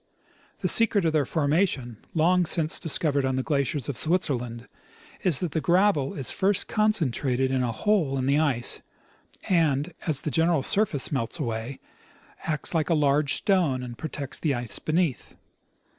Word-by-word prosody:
The - - 0
secret 220 -5 +4
of 160 - +1
their 145 -4 +1
formation, 145 - -1 0.2
long 175 +2 +2
since 160 -2 +1
discovered 145 -3 +1
on 130 0 -1
the 130 - -1
glaciers 140 -2 -2
of 140 - -4
Switzerland, 125 -7 -2 0.6
is 170 -8 +3
that 175 -4 -2
the 160 - -2
gravel 175 -6 +1
is 135 - -1
first 195 +1 +1
concentrated 135 - 0
in 130 -1 0
a 120 -2 -1
hole 150 - 0
in 130 - -2
the 140 +2 +2
ice 135 -7 +2 0.7
and, 160 -3 +1
as 150 -4 +2
the 150 - -4
general 165 -2 +1
surface 190 -5 +2
melts 135 0 -3
away, 120 -2 -5 0.7
acts 155 +2 -2
like 160 -1 0
a 165 - +3
large 145 -1 +2
stone 165 -11 +2
and 120 -1 -8
protects 140 -1 -5
the 145 -4 0
ice 120 -2 -5
beneath. 155 - -2
150 Hz, 160 wpm, -25 LUFS, 130-170 Hz, 0.7 s, secret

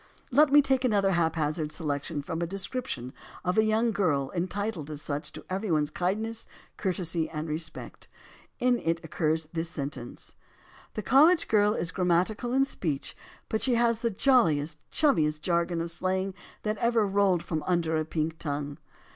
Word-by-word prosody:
Let 285 +3 +5
me 290 0 +7
take 265 -1 +2
another 200 -5 +3
haphazard 160 -3 0
selection 145 -1 -3
from 165 +3 -4
a 170 - 0
description 190 - -4 0.3
of 180 0 +1
a - - +5
young 220 +2 +2
girl 145 -10 0
entitled 185 -2 -2
as 150 -2 -5
such 150 0 -3
to - - -9
every 195 +3 -3
one's 155 -2 +1
kindness, 215 +7 -2 0.3
courtesy, 170 -4 -1
and 155 0 -4
respect. 160 +2 -5 0.5
In 245 -1 +2
it 165 0 0
occurs 160 0 0
this 165 0 -2
sentence: 140 -6 -6 0.6
"The 215 - -3
college 315 - +5
girl 210 0 +3
is 170 - -1
grammatical 185 +6 +1
in 270 +2 +3
speech, 155 - -3 0.3
but 220 - -1
she 255 -2 +2
has 235 -1 +2
the 235 - +1
j 230 +6 +2
oiliest, 155 - +3
chummiest 155 - +2
jargon 170 0 +1
of 165 0 -3
slang 185 +2 -1 0.3
that 215 0 -1
ever 235 -2 +3
rolled 195 -3 +2
from 160 -2 -2
under 170 -3 +1
a 155 - +1
pink 160 0 -2
tongue." 145 -1 -3
175 Hz, 165 wpm, -28 LUFS, 155-215 Hz, 0.6 s, me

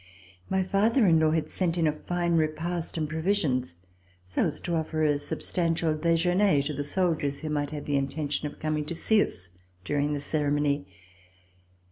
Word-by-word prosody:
My 190 0 +1
father 215 +6 +3
in 165 -4 +5
law 160 0 +4
had 155 -1 0
sent 175 0 -1
in 165 - +2
a 155 - +4
fine 170 +3 -2
repast, 165 +2 -1
and 155 -1 -1
provisions, 155 - 0 0.5
so 90 - 0
as 150 - -4
to 175 - -3
offer 160 -1 -1
a 145 -2 +2
substantial 165 +1 -1
dejeuner 170 +1 +3
to 150 +2 -3
the 145 +1 -3
soldiers 150 -3 0
who 155 - -4
might 145 -1 -1
have 150 -2 -6
the 145 -1 +1
intention 145 +1 -2
of - - -17
com 155 0 -1
ing 150 - -2
to 170 - -3
see 215 +5 +3
us 90 -2 -8 0.4
during 145 0 0
the 145 - -2
ceremony. 145 -5 0
155 Hz, 180 wpm, -27 LUFS, 145-170 Hz, 0.5 s, in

